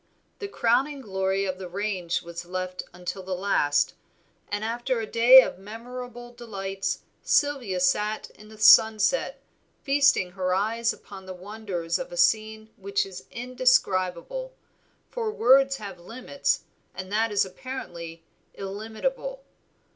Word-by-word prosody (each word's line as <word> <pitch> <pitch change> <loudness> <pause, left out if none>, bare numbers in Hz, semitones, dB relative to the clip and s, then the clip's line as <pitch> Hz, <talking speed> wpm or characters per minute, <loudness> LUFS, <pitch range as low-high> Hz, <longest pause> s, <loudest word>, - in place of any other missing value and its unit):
The 405 - -4
crowning 275 - +1
glory 190 -2 -1
of 185 -1 -3
the 185 -2 -7
range 185 -3 -2
was 170 0 -7
left 185 +1 -4
until 180 +2 -6
the 185 0 -4
last, 180 -6 +1 0.6
and 205 +1 -2
after 240 +2 -1
a 225 - -2
day 245 +4 +8
of - - -6
memorable 240 +3 -9
delights 195 -5 -4 0.2
Sylvia 265 -11 +1
sat 210 +4 0
in 210 0 -16
the 215 - -13
sunset 220 - +5 0.4
feasting 275 -10 +3
her 185 0 -1
eyes 230 +4 +1
upon 190 -2 -11
the 185 - -6
wonders 185 -3 -4
of - - -6
a 175 - -7
scene 220 +4 +1
which 200 0 -1
is 190 -2 -10
indescribable, 250 - 0 0.6
for 460 -3 -2
words 270 - +4
have 200 -4 -8
limits 250 +9 -2 0.3
and 185 0 -7
that 220 +1 +1
is 200 -1 +2
apparently 175 -7 -8 0.3
illimitable. 225 - -4
210 Hz, 130 wpm, -26 LUFS, 185-245 Hz, 0.6 s, day